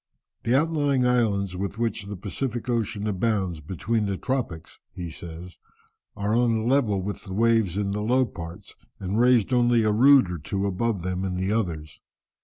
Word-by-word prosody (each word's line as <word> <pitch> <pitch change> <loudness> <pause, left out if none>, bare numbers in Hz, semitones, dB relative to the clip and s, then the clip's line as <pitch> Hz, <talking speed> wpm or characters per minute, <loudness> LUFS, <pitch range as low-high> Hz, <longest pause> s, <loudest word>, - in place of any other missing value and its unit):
"The 120 - +1
outlying 145 -3 +2
islands 105 -6 +1
with 100 +3 -4
which 115 -3 -2
the 100 - -5
Pacific 115 +6 -4
Ocean 110 -4 -1
abounds 95 -5 -1
between 100 +7 -1
the 100 -1 -2
tropics," 120 -12 -4 0.2
he 85 -2 -5
says, 85 +2 -9 0.6
"are 105 +2 0
on 120 -1 +3
a 110 0 -1
level 120 -7 +2
with 100 +2 -5
the 95 -2 -6
waves 110 -4 +2
in 100 -1 -1
the 105 +1 -2
low 125 +4 +3
parts, 85 -1 -9 0.3
and 100 +3 -2
raised 125 -1 +4
only 120 -2 +4
a 105 - +2
rood 125 -2 +6
or 85 - -4
two 95 +6 -2
above 100 0 -1
them 90 0 -2
in 95 -1 -2
the 95 +2 -1
others. 85 -9 -3
105 Hz, 180 wpm, -25 LUFS, 95-120 Hz, 0.6 s, rood